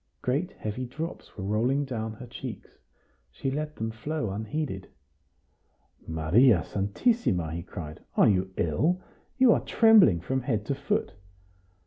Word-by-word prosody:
Great 150 +9 0
heavy 115 +4 -4
drops 155 +7 -7
were 95 - -5
rolling 120 +8 +1
down 110 -4 -4
her 120 +3 -10
cheeks; 125 -3 -9 0.5
she 100 - -3
let 150 +2 -3
them 110 0 -3
flow 115 0 -3
unheeded. 110 0 -4 1.2
"Maria 85 +7 +4
Santissima!" 100 - 0
he 85 - -3
cried. 80 -3 -8 0.2
"Are - - +6
you 95 -1 +2
ill? 155 - +1 0.4
You 260 -2 +6
are - - +3
trembling 215 - +6
from 130 +10 -2
head 115 -5 -1
to 140 - -1
foot!" 140 +1 -1
120 Hz, 135 wpm, -27 LUFS, 95-145 Hz, 1.2 s, Are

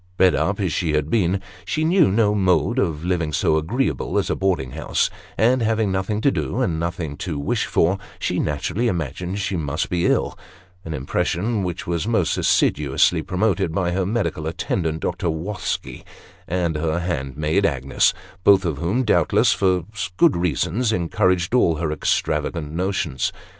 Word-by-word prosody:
Bred 95 -1 +5
up 100 +1 0
as 95 -5 0
she 80 -4 0
had 75 0 0
been, 95 -3 +1 0.2
she 155 +7 -1
knew 170 -1 +4
no 105 0 +3
mode 100 +5 +2
of 80 - -1
living 85 -4 0
so 75 +1 +2
agreeable 80 - -1
as - - 0
a - - +1
boarding 90 -10 0
house; - - -1 0.3
and 125 +3 +3
having 110 -2 +1
nothing 95 +3 -1
to 140 - +3
do, 125 - -2
and 85 -11 0
nothing 85 -3 -3
to 80 -5 -4
wish 70 - -1
for, 90 +4 +2 0.2
she - - -1
naturally 90 +10 -1
imagined 90 - -3
she 100 -1 -2
must 75 -1 -2
be 90 -1 0
very - - +4
ill - - -3 0.4
an 80 -1 -5
impression 95 - -1
which 90 -2 -4
was 85 +3 -2
most 110 -7 +1
assiduously 75 +3 +2
promoted 90 -3 0
by 90 -3 0
her 95 +2 0
medical 100 -6 -2
attendant, 80 0 -2
Dr. 90 0 -1
Wosky, 90 +5 -4 0.4
and 85 -2 -1
her 80 +2 0
handmaid 75 +2 -1
Agues: 70 -7 +2 0.3
both 95 -2 +5
of 75 -5 -2
whom, 100 - 0
doubtless 110 - +3
for 90 -3 +1 0.3
good 170 -2 +5
reasons, 90 +6 0
encouraged 90 -1 +1
all 85 -10 +4
her 80 0 -2
extravagant 75 0 -1
notions. 85 -5 -1
90 Hz, 165 wpm, -22 LUFS, 80-100 Hz, 0.4 s, Bred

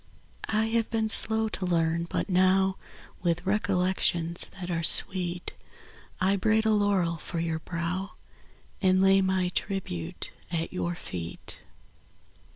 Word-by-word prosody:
I 215 0 +1
have 230 -1 0
been 220 -1 -1
slow 220 0 +6
to 195 - -4
learn, 165 -1 0
but - - -2
now, 190 0 +2 0.5
With 175 +1 -1
recollections 180 -3 +1
■ - - -14
that 180 -1 -5
are 165 -1 -1
sweet, 175 +1 +2 0.7
I 195 +2 +2
braid 220 +3 +1
a 220 - +3
laurel 200 -5 +1
for 170 +1 -6
your 165 -1 -2
brow 175 +4 -4 0.7
And 185 -1 +3
lay 195 0 +4
my 190 -1 0
tribute 170 - -4 0.2
at 165 0 -3
your 175 -1 -3 0.2
eet. 85 -2 -7
185 Hz, 135 wpm, -27 LUFS, 170-195 Hz, 0.7 s, slow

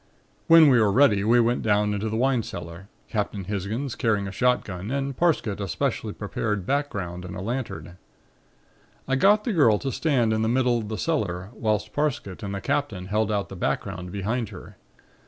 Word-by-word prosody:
"When 165 -1 +8
we 125 -4 +5
were 105 -2 +3
ready 105 -4 +4
we 115 +3 +4
went 120 +1 +2
down 105 -1 +2
into 105 +2 -2
the 110 - -3
wine 130 +1 +2
cellar, 85 -1 -8 0.2
Captain 105 -2 -2
Hisgins 105 +7 -3
carrying 105 -3 0
a - - -5
shotgun 105 -4 0
and 140 0 -2
Parsket 145 - +1
a 100 - -2
specially 85 - -2
prepared 105 -4 -3
background 100 -11 -2
and 90 +1 -7
a - - -5
lantern. 95 -6 -5 1.1
I 135 - +1
got 205 +9 +4
the 230 - -1
girl 120 - +4
to 135 +5 -3
stand 125 -7 +1
in 110 - 0
the 110 - +1
middle 125 -1 +2
of 105 -2 -6
the 110 - -3
cellar 100 - -2
whilst 110 -2 -1
Parsket 140 -11 -2
and 100 -1 -4
the 100 - -5
Captain 100 -11 -2
held 110 +1 +1
out 100 -1 -1
the 95 - -8
background 90 +4 -3
behind 110 +4 -2
her. - - -11
110 Hz, 190 wpm, -25 LUFS, 100-130 Hz, 1.1 s, When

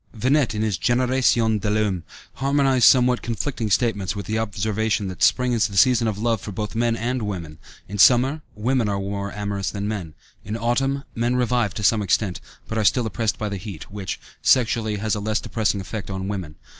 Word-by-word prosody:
Venette, 130 +1 +1
in 105 - -1
his 105 -5 -1
Génération 120 -3 +2
de 105 - -1
l'homme, 105 -5 0 0.3
harmonized 135 -2 +3
somewhat 125 -1 +4
conflicting 115 -1 -3
statements 100 -3 +1
with 100 - -5
the 110 +1 -1
observation 110 -1 -1
that 90 - -9
spring 125 -1 +3
is 110 -5 +2
the 100 -2 -7
season 120 +1 +4
of 105 -2 -2
love 115 -1 0
for 105 - -6
both 105 +2 -4
men 115 0 +1
and 125 +2 -2
women; 85 -7 -5 0.3
in 105 +1 -6
summer, 130 +7 +5
women 115 +1 0
are 100 - -1
more 100 0 -4
amorous 100 -1 -3
than 100 0 -4
men; 95 -8 -5 0.3
in 105 +2 -4
autumn, 135 +4 0
men 120 +2 0
revive 125 -4 +1
to 105 - -4
some 105 +2 +3
extent, 100 -1 0 0.3
but 110 - -2
are - - +1
still 120 +4 +3
oppressed 110 0 -1
by 110 - -3
the 100 -1 -3
heat, 95 -3 -9
which, 100 -2 -5 0.2
sexually, 115 -3 +2
has 105 +1 -1
a 105 - -1
less 110 +1 -1
depressing 110 -3 -1
effect 100 +2 -6
on 95 0 -4
women. 95 -7 -5
110 Hz, 200 wpm, -23 LUFS, 100-120 Hz, 0.3 s, summer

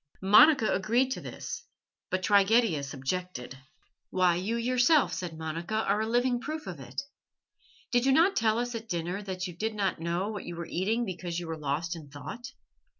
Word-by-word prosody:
Monica 215 +5 +6
agreed 235 +7 +1
to - - -3
this, - - -6 0.5
but 185 0 -1
Trigetius 200 - +3
objected. 135 -2 -4 0.5
"Why, 180 -1 +3
you 195 +7 -1
yourself," 250 +5 +3
said 170 -3 -5
Monica, 165 +5 -4
"are 215 -1 +1
a 220 - -1
living 245 +1 +2
proof 310 +3 -5
of 180 -6 -7
it. 130 - -5 0.9
Did 245 0 +2
you - - +5
not 340 +8 +4
tell 220 - +2
us 245 +1 -2
at 225 -1 -6
dinner 175 +3 -2
that 185 -2 -4
you 180 -3 -6
did 220 +4 -2
not 195 -5 -1
know 170 +4 -1
what 210 -3 -5
you 175 - -6
were 170 0 -5
eating 215 +8 0
because 175 -3 -4
you 175 - -6
were 165 - -3
lost 155 +3 -2
in 155 -4 -10
thought? 145 - -8
195 Hz, 185 wpm, -29 LUFS, 170-235 Hz, 0.9 s, Monica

